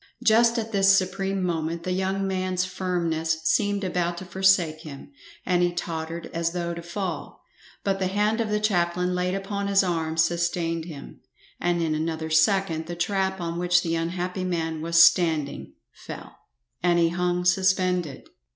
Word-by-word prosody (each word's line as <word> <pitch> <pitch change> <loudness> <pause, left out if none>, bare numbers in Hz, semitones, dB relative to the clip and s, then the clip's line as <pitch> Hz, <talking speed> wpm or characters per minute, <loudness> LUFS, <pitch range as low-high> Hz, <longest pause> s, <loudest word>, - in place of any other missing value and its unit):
Just 230 +2 +4
at 225 -1 -3
this 195 -1 +5
supreme 195 +1 -1
moment 165 -1 -2
the 185 - -2
young 190 +1 -1
man's 185 -1 -1
firmness 170 -3 -1
seemed 205 +4 +1
about 175 -2 -1
to 185 - -7
forsake 180 -4 +2
him, 150 - -10 0.3
and 180 -1 +2
he 175 0 +2
tottered 165 -1 -4
as 165 0 -1
though 170 -1 -2
to 170 - -6
fall, 170 0 -5 0.4
but 195 -1 0
the 190 - 0
hand 210 +4 +1
of 220 - -2
the 210 0 +1
chaplain 180 -3 0
laid 180 +1 -1
upon 200 +1 -3
his 200 0 +4
arm 160 -3 -2
sustained 165 0 0
him, 150 -5 -10 0.4
and 175 -1 0
in 160 -1 0
another 160 0 -3
second 160 0 +2
the 175 - -5
trap 190 +2 -1
on 170 0 -3
which 175 0 +3
the 165 - -1
unhappy 180 +3 -2
man 165 -3 -2
was 170 +1 +5
standing 160 -5 +2 0.2
fell, - - -10 0.5
and 175 -1 +3
he 170 -1 +3
hung 180 +1 -1
suspended. 180 -3 +1
175 Hz, 165 wpm, -25 LUFS, 165-190 Hz, 0.5 s, this